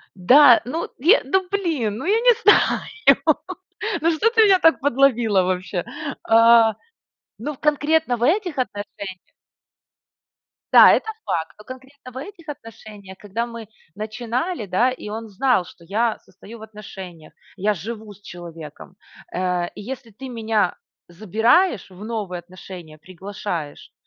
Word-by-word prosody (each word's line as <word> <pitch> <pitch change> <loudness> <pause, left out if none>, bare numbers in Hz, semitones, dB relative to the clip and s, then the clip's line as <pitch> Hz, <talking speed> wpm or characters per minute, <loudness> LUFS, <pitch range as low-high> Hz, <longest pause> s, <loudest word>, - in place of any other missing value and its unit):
Да, 245 +7 +6
ну 315 +7 -4
е 365 - +5
ну 380 -1 0
блин! 315 - -1
Ну - - -6
я 420 +5 +2
не 485 +1 +5
знаю, 465 +2 +3 0.8
ну 330 +2 +2
что 365 +8 +2
ты 455 -1 +4
меня 390 -3 +5
так 325 -2 +4
подловила 240 -7 +2
вообще? 180 0 -3 0.4
А. 230 -1 +5 0.6
Ну 285 +8 -4
в - - -19
конкретно 300 -2 +1
в 235 - -9
этих 350 - +1
отношениях 205 -5 -5 1.5
Да, - - +9
это 440 - -1
факт, 160 -1 -3
но 210 - -16
конкретно 260 +1 -12
в - - -9
этих 335 +3 -10
отношениях, 215 -7 -11
когда 210 +4 -4
мы 230 -2 -9 0.3
начинали, 235 - -4
да, 190 +8 +2
и 250 -4 -8
он 225 +2 -6
знал, 215 -1 +1
что 170 - -16
я 220 +6 -1
состою 215 +5 -14
в - - -15
отношениях, 195 -6 -11 0.2
я 205 +2 +1
живу 215 +3 -8
с 205 - -22
человеком. 170 -2 -11 0.4
Э, 180 -1 -1
и - - -9
если 245 +1 -8
ты 260 +6 -10
меня 220 -5 -1 0.3
забираешь 220 - +1
в 190 +3 -11
новые 210 -6 -4
отношения, 175 -3 -12
приглашаешь, 180 -2 -7
225 Hz, 140 wpm, -21 LUFS, 190-275 Hz, 1.5 s, Да